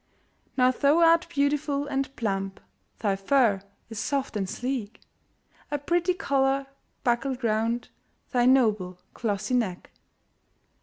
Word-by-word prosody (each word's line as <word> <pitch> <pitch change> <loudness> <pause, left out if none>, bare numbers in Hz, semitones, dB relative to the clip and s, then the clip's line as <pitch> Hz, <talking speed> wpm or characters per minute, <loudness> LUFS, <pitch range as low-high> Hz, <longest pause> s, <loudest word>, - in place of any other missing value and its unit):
Now 255 0 +5
thou 280 +4 +3
art 335 0 +5
beautiful 285 -1 0
and 275 -1 -2
plump. 195 -3 -2 0.4
Thy 200 -3 +1
fur 205 0 +2 0.3
is 225 -2 -6
soft 275 +1 -2
and 195 -3 -1
sleek, 245 -3 -4 0.7
A 290 - -1
pretty 345 +5 +1
collar 275 -5 +1 0.4
buckled 250 +1 0
round 230 +2 0 0.4
Thy 245 -1 +3
noble, 215 -9 +3 0.2
glossy 215 +2 -2
neck. 215 -8 -1
255 Hz, 115 wpm, -27 LUFS, 215-280 Hz, 0.7 s, Now